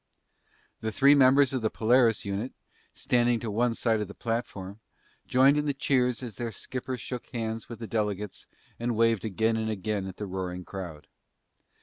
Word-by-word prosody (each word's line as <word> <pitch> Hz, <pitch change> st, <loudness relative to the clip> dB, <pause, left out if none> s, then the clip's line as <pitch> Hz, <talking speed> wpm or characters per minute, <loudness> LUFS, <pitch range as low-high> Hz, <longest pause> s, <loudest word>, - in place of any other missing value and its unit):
The 110 Hz, -, -3 dB
three 140 Hz, +5 st, +6 dB
members 135 Hz, 0 st, +5 dB
of 130 Hz, -, -1 dB
the 110 Hz, -, +1 dB
Polaris 115 Hz, 0 st, +3 dB
unit, 100 Hz, +6 st, -3 dB, 0.4 s
standing 120 Hz, -1 st, +2 dB
to 110 Hz, -2 st, -4 dB
one 115 Hz, +2 st, +1 dB
side 110 Hz, -2 st, +1 dB
of 105 Hz, -, -3 dB
the 100 Hz, -, -11 dB
platform, 110 Hz, -4 st, -4 dB, 0.5 s
joined 135 Hz, +3 st, +5 dB
in 150 Hz, 0 st, 0 dB
the 140 Hz, -, 0 dB
cheers 130 Hz, -3 st, +1 dB
as 115 Hz, -5 st, -7 dB
their 120 Hz, -1 st, -3 dB
skipper 130 Hz, +4 st, -5 dB
shook 125 Hz, 0 st, -6 dB
hands 115 Hz, -2 st, -4 dB
with 115 Hz, -, -7 dB
the 115 Hz, -, -6 dB
delegates 105 Hz, -2 st, -2 dB, 0.3 s
and 120 Hz, 0 st, -1 dB
waved 115 Hz, -1 st, +3 dB
again 110 Hz, +2 st, +1 dB
and 110 Hz, 0 st, -1 dB
again 105 Hz, -1 st, -2 dB
at 95 Hz, -, -8 dB
the 105 Hz, -, -4 dB
roaring 90 Hz, -2 st, -4 dB
crowd. 90 Hz, -6 st, -7 dB
115 Hz, 180 wpm, -28 LUFS, 105-125 Hz, 0.5 s, three